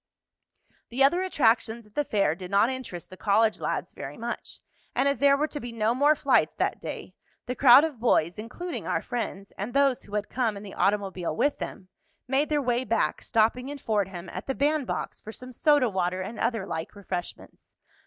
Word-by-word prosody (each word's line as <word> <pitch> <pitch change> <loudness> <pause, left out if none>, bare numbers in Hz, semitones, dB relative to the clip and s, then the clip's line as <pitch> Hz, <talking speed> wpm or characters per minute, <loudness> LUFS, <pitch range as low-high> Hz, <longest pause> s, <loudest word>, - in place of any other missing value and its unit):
The 255 +3 +2
other 345 +7 +4
attractions 235 - +1
at 210 - -23
the 295 - +1
fair 200 - +1
did 180 +1 -8
not 200 +5 +3
interest 245 -11 -7
the 185 - -10
college 215 +2 +2
lads - - -3
very - - -7
much, - - -6 0.4
and 270 - +2
as 280 - +1
there 280 0 +5
were 300 - +1
to 295 - -4
be 245 -3 -6
no 225 0 +1
more 290 +4 +4
flights - - +2
that - - -1
day - - -6 0.3
the 250 - -2
crowd 260 +1 +8
of 305 -7 -3
boys, 180 -6 +2
including 335 +11 -5
our - - 0
friends 200 -5 -4
and 215 +7 -4
those 275 -2 +3
who 205 - -8
had 210 0 -1
come 230 -5 -1
in 200 - -9
the 200 - -9
automobile 195 -5 0
with 290 - +1
them, 185 - -7 0.4
made 270 +3 +1
their 295 -2 +1
way 245 0 +1
back, 230 -2 0
stopping 230 +4 +1
in 290 - -5
Fordham 195 -7 -2
at 185 - -7
the 270 - -1
"Band 290 -1 +1
Box" - - -4
for 220 - -8
some 255 +3 -9
soda 290 +1 +3
water 185 -2 -1
and 215 +4 -7
other 225 -4 0
like 160 +1 -5
refreshments. 185 -3 -7
230 Hz, 205 wpm, -27 LUFS, 200-275 Hz, 0.4 s, crowd